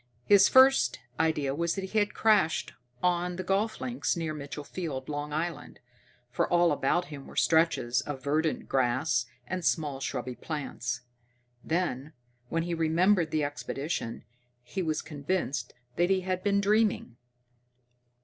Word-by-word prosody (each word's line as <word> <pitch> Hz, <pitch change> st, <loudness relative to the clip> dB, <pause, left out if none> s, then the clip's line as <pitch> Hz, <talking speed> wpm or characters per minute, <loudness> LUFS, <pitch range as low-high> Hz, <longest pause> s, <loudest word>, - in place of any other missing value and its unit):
His 200 Hz, -1 st, +6 dB
first 265 Hz, +1 st, +5 dB, 0.2 s
idea 155 Hz, -4 st, +1 dB
was 170 Hz, +3 st, -1 dB
that 195 Hz, -, -3 dB
he 205 Hz, +3 st, 0 dB
had 205 Hz, 0 st, 0 dB
crashed 210 Hz, -7 st, +2 dB, 0.3 s
on 180 Hz, 0 st, +1 dB
the 185 Hz, -, -4 dB
golf 205 Hz, +4 st, 0 dB
links 245 Hz, -7 st, -1 dB
near 160 Hz, -2 st, -2 dB
Mitchell 145 Hz, 0 st, -6 dB
Field, 145 Hz, -5 st, -5 dB
Long 145 Hz, 0 st, -4 dB
Island, 165 Hz, +3 st, -4 dB, 0.5 s
for -, -, 0 dB
all 175 Hz, -1 st, +4 dB
about 150 Hz, +5 st, +1 dB
him 140 Hz, -2 st, -9 dB
were -, -, -12 dB
stretches 160 Hz, -7 st, +2 dB
of 135 Hz, -3 st, -6 dB
verdant 155 Hz, +2 st, 0 dB
grass 130 Hz, 0 st, +1 dB, 0.2 s
and 185 Hz, +5 st, -4 dB
small 150 Hz, -6 st, 0 dB
shrubby 130 Hz, -2 st, -3 dB
plants. 135 Hz, -4 st, -4 dB, 0.6 s
Then, 155 Hz, -4 st, -2 dB, 0.4 s
when 165 Hz, 0 st, 0 dB
he 175 Hz, 0 st, -3 dB
remembered 170 Hz, +2 st, +3 dB
the 155 Hz, -1 st, 0 dB
expedition, 140 Hz, -2 st, -4 dB, 0.4 s
he 155 Hz, +10 st, -4 dB
was 155 Hz, -3 st, -1 dB
convinced 145 Hz, -4 st, -2 dB, 0.3 s
that 175 Hz, +1 st, +3 dB
he 190 Hz, -1 st, +3 dB
had 185 Hz, 0 st, -2 dB
been 200 Hz, 0 st, +2 dB
dreaming. 205 Hz, -, +1 dB
160 Hz, 145 wpm, -29 LUFS, 140-185 Hz, 0.6 s, His